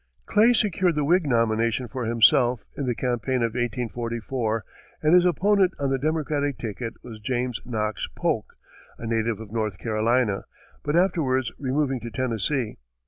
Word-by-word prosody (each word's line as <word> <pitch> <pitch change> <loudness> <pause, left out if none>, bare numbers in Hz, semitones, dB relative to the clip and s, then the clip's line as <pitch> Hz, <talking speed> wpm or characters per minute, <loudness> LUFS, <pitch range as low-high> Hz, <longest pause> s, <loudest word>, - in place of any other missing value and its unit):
Clay 220 +3 +5
secured 185 -6 +2
the 150 -1 +1
Whig 175 +1 +3
nomination 115 0 +1
for 125 +2 -4
himself, 120 +1 +4
in 140 - -3
the 120 - 0
campaign 125 0 -1
of 115 -1 0
1844, 115 -1 -2 0.4
and 155 +2 +4
his 180 0 +6
opponent 190 +1 +3
on 140 -1 0
the 135 - +1
Democratic 145 -2 -1
ticket 115 +1 -5
was 115 -3 -9
James 125 +2 -2
Knox 110 -3 -2
Polk, - - -1 0.4
a - - -8
native 115 -1 0
of 110 -2 -9
North 110 -4 -2
Carolina, 110 0 +1 0.4
but 145 +1 -1
afterwards 150 -9 +2
removing 135 -1 0
to 120 - -6
Tennessee. 120 - -1
125 Hz, 150 wpm, -25 LUFS, 115-145 Hz, 0.4 s, his